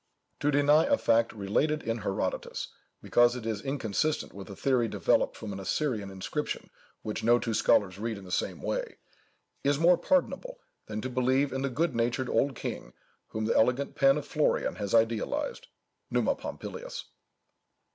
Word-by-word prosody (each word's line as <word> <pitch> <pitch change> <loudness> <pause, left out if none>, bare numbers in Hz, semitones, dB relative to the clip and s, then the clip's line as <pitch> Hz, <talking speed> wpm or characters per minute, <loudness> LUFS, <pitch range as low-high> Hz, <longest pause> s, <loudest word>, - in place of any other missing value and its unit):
To 145 - +1
deny 145 +2 +5
a 285 0 +3
fact 115 - +3
related 125 +10 0
in 115 0 -2
Herodotus, 95 -2 -3 0.3
because 120 0 +4
it 120 -3 -6
is 110 -3 -2
inconsistent 135 +2 -1
with 100 +1 -9
a 100 - -7
theory 125 +1 +2
developed - - +1
from 105 -2 -6
an 95 - -6
Assyrian 105 0 -1
inscription 95 -1 -4 0.3
which 105 - -4
no 120 +2 +5
two 115 -1 -2
scholars 100 -2 +3
read 110 0 -3
in 100 - -10
the 90 - -10
same - - -2
way, - - -3 0.7
is 140 0 +2
more 170 +3 +5
pardonable, 280 - 0 0.3
than 110 0 -4
to 130 - -3
believe 130 +2 +2
in 135 - -2
the 135 - 0
good 155 +3 0
natured 120 +2 0
old 140 -1 +1
king - - -6 0.3
whom 110 0 -3
the - - +1
elegant 125 +5 +2
pen 135 0 +4
of 150 - -4
Florian 150 0 0
has 105 +1 -1
idealized—_Numa 115 - -1
Pompilius. - - -7
120 Hz, 165 wpm, -29 LUFS, 110-145 Hz, 0.7 s, deny